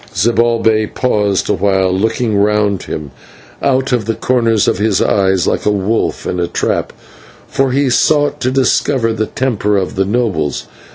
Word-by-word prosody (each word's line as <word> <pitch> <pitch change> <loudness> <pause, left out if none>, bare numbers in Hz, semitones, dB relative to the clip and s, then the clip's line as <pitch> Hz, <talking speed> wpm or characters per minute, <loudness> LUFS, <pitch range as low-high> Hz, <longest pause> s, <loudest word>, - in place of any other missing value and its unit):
Zibalbay 115 -1 +2
paused 105 -6 0
awhile, 95 -2 +1
looking 110 +3 0
round 105 -1 +1
him 75 -3 -6 0.5
out 135 -1 +1
of 120 -4 0
the 115 0 -1
corners 115 -2 +1
of - - +1
his 105 -1 +1
eyes, 95 -3 +1
like - - -1
a - - +1
wolf 105 +2 -1
in 90 - -2
a 85 - 0
trap, - - -2 0.6
for 135 -1 0
he 140 +2 +1
sought 145 +3 +2
to 130 - 0
discover 130 -2 +1
the 110 -1 -2
temper 105 -5 -1
of 95 -2 -2
the 95 - 0
nobles. 95 - -1
110 Hz, 160 wpm, -15 LUFS, 100-125 Hz, 0.6 s, Zibalbay